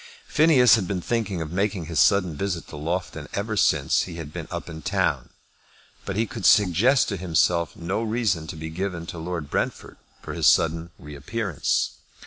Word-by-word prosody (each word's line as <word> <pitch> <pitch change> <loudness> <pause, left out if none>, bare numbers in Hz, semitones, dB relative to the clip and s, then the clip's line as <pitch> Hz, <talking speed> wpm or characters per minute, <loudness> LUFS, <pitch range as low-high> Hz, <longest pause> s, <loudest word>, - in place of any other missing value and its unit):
Phineas 145 - +5
had 95 -5 -2
been 95 -1 -2
thinking 100 -4 -2
of 80 - -8
making 95 -1 -1
this 80 -2 -2
sudden 90 +1 +3
visit 90 -1 -3
to - - -9
Loughton 80 0 -4
ever 105 +2 -2
since 100 - +2
he 90 - -8
had 80 -3 -8
been - - -6
up - - -5
in 80 -1 -8
town, - - 0 0.8
but 95 - -3
he 110 +3 +1
could 115 -2 -8
suggest 105 - +4
to 100 - -3
himself 85 -1 +1
no 95 +6 -3
reason 110 -8 -1
to 80 - -6
be 80 0 -6
given 90 -1 -4
to 85 - -7
Lord 80 -3 -5
Brentford - - -3 0.2
for - - -7
his - - +2
sudden 80 +1 +3
reappearance. 75 - -2
90 Hz, 180 wpm, -24 LUFS, 80-105 Hz, 0.8 s, Phineas